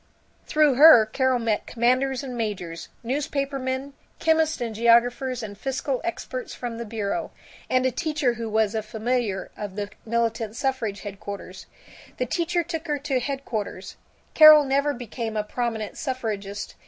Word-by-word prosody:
Through 300 -2 +4
her 290 -7 +9
Carol 260 +3 +1
met 225 -3 -1
commanders 255 +3 +1
and 255 -2 -6
majors, 195 -7 -4
newspapermen, 275 0 -2 0.2
chemists 320 -1 +2
and 235 -2 -3
geographers 235 +2 +3
and 205 -2 -6
fiscal 270 +3 -2
experts 475 +8 -5
from 235 -2 -5
the 235 - -4
bureaus, 220 +8 -3 0.4
and 255 0 +2
a 260 - +2
teacher 300 -3 0
who 230 -1 -5
was 220 -1 +1
a 220 - -1
familiar 220 -1 -2
of 205 -2 -6
the 205 0 -4
militant 230 -1 -1
suffrage 235 -6 -2
headquarters. 200 -2 -8 0.5
The - - 0
teacher 345 0 0
took 335 -1 -5
her 295 -1 0
to 275 -2 -1
headquarters. 235 -8 -4 0.4
Carol 310 -1 +9
never 280 +1 +1
became 230 -2 -5
a 210 - 0
prominent 220 -1 -3
suffragist. 210 -7 -4
245 Hz, 145 wpm, -25 LUFS, 220-275 Hz, 0.5 s, her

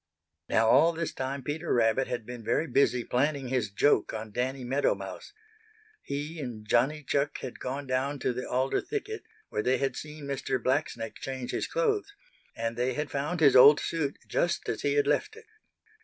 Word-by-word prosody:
Now 115 - +3
all 165 +8 +6
this 165 0 -3
time 135 +1 -4
Peter 150 +4 -3
Rabbit 120 +3 +3
had 120 -3 -4
been 120 -1 -8
very 155 - +1
busy 130 -5 +2
planning 135 +1 0
his 125 -5 0
joke 110 +2 +2
on 110 0 -6
Danny 130 +4 -2
Meadow 135 +4 +1
Mouse. - - -8 0.7
He 150 +4 -5
and 115 -6 -6
Johnny 135 +7 +2
Chuck 140 +1 0
had 125 - -7
gone 135 +3 -4
down 130 +2 -1
to - - 0
the 125 +1 -5
alder 130 +2 +1
thicket, 435 0 -4 0.3
where - - -1
they 130 +3 +2
had 135 -1 -1
seen 150 0 -8
Mr. 135 -1 -1
Blacksnake 130 -4 -1
change 130 -2 -5
his - - -2
clothes, 425 -5 0 0.4
and 115 0 -2
they 125 +2 0
had 150 0 -3
found 150 +5 -2
his 145 -3 +6
old 145 +3 +9
suit 155 -4 -2
just 175 - 0
as - - -2
he 140 - +1
had 145 - +3
left 150 - 0
it. 445 0 -14
135 Hz, 185 wpm, -29 LUFS, 125-150 Hz, 0.7 s, old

